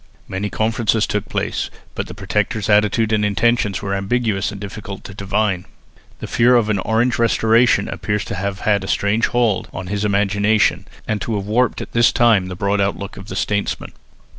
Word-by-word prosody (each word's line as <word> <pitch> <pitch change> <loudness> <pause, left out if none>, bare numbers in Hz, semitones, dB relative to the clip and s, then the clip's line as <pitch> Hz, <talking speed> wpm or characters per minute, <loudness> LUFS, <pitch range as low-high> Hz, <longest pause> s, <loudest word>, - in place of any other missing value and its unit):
Many 95 +2 -3
conferences 110 0 +1
took 105 0 -3
place, - - -2 0.2
but - - -4
the - - -9
Protector's 110 0 -1
attitude 105 +1 +3
and 105 -1 +2
intentions 105 -2 +1
were 100 -1 -2
ambiguous 100 0 0
and 100 - -8
difficult 100 -1 -7
to 100 - -9
divine. 100 -1 -1 0.6
The - - -4
fear 125 +2 +3
of 110 -3 +3
an 100 - 0
Orange 115 +5 +1
restoration 115 -1 +3
appears 105 -1 -2
to - - -5
have 100 +1 -3
had 105 -2 +1
a - - -5
strange 105 +4 +1
hold 120 -5 0
on 95 - -6
his 105 0 -1
imagination 105 +1 +2 0.2
and 105 -2 -1
to 115 - -2
have 100 -1 -3
warped 120 +4 +1
at - - -12
this 120 0 +4
time 115 -7 +3
the 90 - -6
broad 100 +2 0
outlook 100 0 -2
of 100 0 -10
the - - -6
statesman. 105 -1 -2
105 Hz, 190 wpm, -19 LUFS, 100-110 Hz, 0.6 s, this